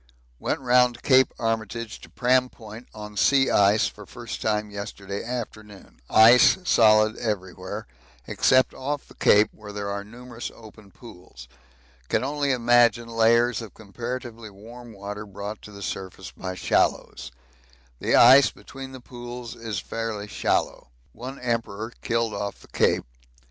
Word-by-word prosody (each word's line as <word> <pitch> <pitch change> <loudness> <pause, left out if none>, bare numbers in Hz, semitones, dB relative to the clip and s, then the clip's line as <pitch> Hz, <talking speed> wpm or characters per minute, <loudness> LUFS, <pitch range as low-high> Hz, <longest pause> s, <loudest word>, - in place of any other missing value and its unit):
Went - - -2
round 125 -1 +3
Cape 130 -1 +5
Armitage 115 0 -3
to - - -13
Pram 125 +1 +2
Point 110 +1 -12
on 105 -1 -10
sea 135 +5 +3
ice 100 +1 +4
for 105 -2 -7
first 120 -1 -8
time 105 -1 -1
yesterday 100 -1 -6
afternoon. 110 -4 -8
Ice 115 +8 +7
solid 110 -8 +4
everywhere, 100 -1 -4 0.4
except 130 - +3
off 145 +2 -4
the - - -16
Cape, 105 +1 +4
where 105 -1 -11
there 100 0 -4
are 100 0 -4
numerous 120 +2 -9
open 110 -2 -15
pools. 100 -4 -14 0.6
Can - - +1
only 145 +1 -1
imagine 120 -1 +3
layers 115 0 +3
of 115 - -10
comparatively 115 +2 -7
warm 115 +4 -13
water 105 0 -7
brought 100 +2 -7
to 105 - -12
the 100 -1 -10
surface 95 -1 -6
by 95 0 -6
shallows. - - 0 0.7
The - - +1
ice 130 +3 +8
between 135 -1 -11
the 130 - -10
pools 120 -1 -9
is 115 -3 -5
fairly 110 -1 -4
shallow. 105 - -1 0.2
One 130 +4 -8
Emperor 115 -2 -3
killed 115 -1 -1
off 100 0 -4
the - - -18
Cape. - - +1
115 Hz, 145 wpm, -24 LUFS, 105-120 Hz, 0.7 s, ice